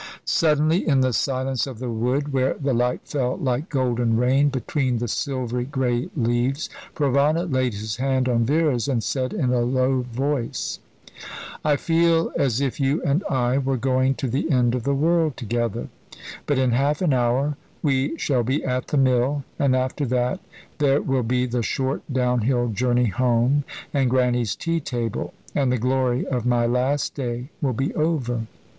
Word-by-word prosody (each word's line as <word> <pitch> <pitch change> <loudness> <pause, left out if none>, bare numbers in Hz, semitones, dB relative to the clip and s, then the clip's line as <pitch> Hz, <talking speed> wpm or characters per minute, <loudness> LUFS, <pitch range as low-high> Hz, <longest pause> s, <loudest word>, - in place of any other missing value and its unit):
Suddenly, 155 +2 +2
in 135 -4 +4
the 130 -1 +2
silence 130 0 0
of 130 -4 -7
the 125 0 -4
wood, 130 +6 -1
where 130 0 +1
the 140 -2 -1
light 125 +1 0
fell 130 -3 -2
like 130 +5 -1
golden 120 -4 +1
rain 135 +4 +3
between 130 -1 -1
the 120 +1 -2
silver 125 0 -2
grey 125 -2 -1
leaves, 120 +4 0 0.2
Provana 145 +4 +2
laid 130 - 0
his 105 +1 -4
hand 130 0 +1
on 120 -2 +2
Vera's, 140 -3 +1
and 125 -5 0
said 130 -2 -1
in 125 -1 0
a 125 - +2
low 130 +1 +1
voice: 125 +1 -2 0.8
"I 150 -1 +3
feel 165 +2 +2
as 130 -4 +1
if 140 -1 -2
you 140 +3 +1
and 145 +7 +1
I 130 0 +1
were 135 -1 0
going 130 +2 +1
to 135 -2 -3
the 135 +7 -1
end 125 -4 +3
of 125 -2 -2
the 140 0 +1
world 160 0 +2
together; 120 0 -2 0.6
but 145 - +1
in 130 -1 +2
half 140 +7 +1
an 155 -6 +3
hour 130 +4 +1 0.3
we 140 +1 +1
shall 130 -6 +1
be 130 +6 -1
at 125 -1 -1
the 150 - -1
mill, 135 +2 +2 0.2
and 135 -2 +3
after 130 +2 -1
that 125 0 0 0.4
there 140 -1 +3
will 135 -1 +1
be 125 +2 0
the 120 -1 -1
short 130 +4 -1
down 125 -2 +1
hill 120 +1 +1
journey 120 +2 +1
home, 125 +5 +2 0.3
and 135 -3 +2
Grannie's 125 -3 +1
tea 165 0 -1
table, 120 -6 -3 0.2
and 135 -3 +1
the 125 - +1
glory 125 +1 +1
of 125 -4 -2
my 120 -1 +2
last 125 +4 0
day 125 -1 -4
will 135 -4 +1
be 135 +5 -2
over." 125 -8 -1
130 Hz, 175 wpm, -23 LUFS, 120-140 Hz, 0.8 s, in